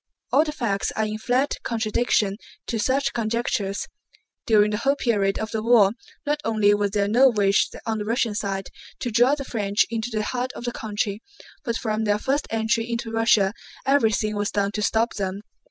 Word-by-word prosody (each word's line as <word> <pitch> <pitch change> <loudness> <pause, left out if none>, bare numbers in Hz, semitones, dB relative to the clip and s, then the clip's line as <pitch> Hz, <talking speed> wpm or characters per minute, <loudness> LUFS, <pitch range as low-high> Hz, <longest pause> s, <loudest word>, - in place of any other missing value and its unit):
All 300 - +5
the 310 - -3
facts 220 -9 -1
are 220 - 0
in 215 0 -4
flat 255 +5 0
contradiction 220 -3 0 0.3
to 230 - -2
such 270 +5 +1
conjectures. 220 -3 -1 0.6
During 210 -2 +4
the 210 - -1
whole 275 +5 +1
period 205 -7 +1
of 220 -1 -4
the 220 - -2
war 220 -4 +5 0.3
not 295 0 0
only 215 -2 +3
was 205 0 +1
there 200 0 0
no 250 +6 +5
wish 200 -4 +2 0.2
on 220 -1 -1
the 210 - -4
Russian 230 0 0
side 195 -2 -3 0.3
to 245 - -2
draw 245 +5 +4
the 275 -2 -6
French 205 -4 +1
into 230 0 -2
the 215 -1 -1
heart 250 +3 -2
of - - -8
the 240 - -1
country, 210 -2 -3 0.4
but 235 -1 -1
from 220 -1 -2
their 205 0 +2
first 275 +7 -1
entry 225 +1 0
into 235 -1 -3
Russia 225 -3 +3 0.3
everything 220 -6 +2
was 205 -1 -1
done 200 0 0
to 210 - -3
stop 225 +3 +1
them. 195 0 -3
220 Hz, 190 wpm, -24 LUFS, 205-240 Hz, 0.6 s, All